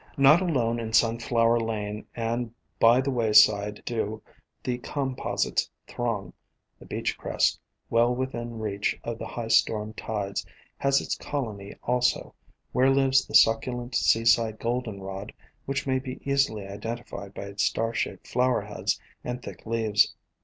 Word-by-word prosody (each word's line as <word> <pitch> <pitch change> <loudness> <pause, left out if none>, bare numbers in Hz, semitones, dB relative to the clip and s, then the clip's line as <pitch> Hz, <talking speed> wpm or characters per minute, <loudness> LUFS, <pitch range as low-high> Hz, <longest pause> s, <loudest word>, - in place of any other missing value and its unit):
Not 140 +5 +7
alone 120 -10 +1
in 110 -1 -5
Sunflower 115 0 +3
Lane 105 -2 -3
and 115 0 -2 0.3
by 120 +3 +6
the 135 +1 -1
way 115 -4 0
sides 105 -1 +5
do 110 -2 -2 0.4
the 125 -1 -2
Composites 135 0 -1 0.2
throng; 105 -7 -3 0.5
the - - -14
beach - - -2
crest, - - +1 0.3
well 120 +1 +3
within 120 -2 -4
reach 105 -2 -2
of 115 -1 -4
the - - -5
high 115 -2 -5
storm 110 -1 +2
tides, 100 -3 -3 0.4
has 140 0 +3
its - - -2
colony 110 -9 -5
also, 125 0 +1 0.4
where 130 +1 +4
lives 135 0 +3
the - - -4
suc 115 0 +6
culent 125 0 -5
Seaside 115 -1 +3
Goldenrod 105 -5 -4 0.3
which 135 0 -1
may 130 -1 +1
be 130 0 -7
easily 140 -7 +1
identified 105 0 -6
by - - -5
its 100 0 -4
star 115 0 0
shaped - - -3
flower 125 0 +2
heads - - -2 0.2
and 125 0 -5
thick - - -10
leaves. 110 -2 +2
115 Hz, 145 wpm, -27 LUFS, 110-125 Hz, 0.5 s, Not